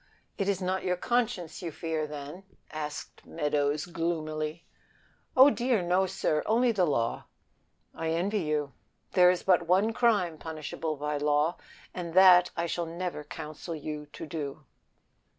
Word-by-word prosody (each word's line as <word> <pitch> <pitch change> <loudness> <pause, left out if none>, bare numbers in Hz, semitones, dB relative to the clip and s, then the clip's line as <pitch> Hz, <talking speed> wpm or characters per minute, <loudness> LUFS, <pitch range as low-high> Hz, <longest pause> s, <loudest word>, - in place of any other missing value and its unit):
"It 195 0 -1
is 190 -1 -1
not 185 +1 -1
your 180 -1 0
conscience 230 -7 -1
you 170 -3 -4
fear, 160 0 -3
then?" 150 +5 -8 0.3
asked 150 -1 -6
the 160 -2 -5
other 145 0 +1
gloomily. 155 -1 -3 0.7
"Oh, 270 +3 +9
dear, 240 -7 +1
no, 180 +2 +2
sir, 155 -3 0
only 235 +2 +3
the 195 -5 +2
law." 115 -5 -1 0.7
"I 165 0 -3
envy 185 +6 0
you. 150 -3 -1 0.4
There 180 -1 +6
is 180 -1 +1
but 175 -3 +3
one 195 +6 +3
crime 205 -10 +2
punishable 155 0 -4
by 150 +1 -2
law, 150 +3 +1 0.4
and 170 -2 -6
that 180 -1 +8
I 170 - 0
shall 170 0 -2
never 170 -2 -4
counsel 155 +2 -7
you 150 -1 -6
to." 155 -3 -6
165 Hz, 150 wpm, -29 LUFS, 150-185 Hz, 0.7 s, Oh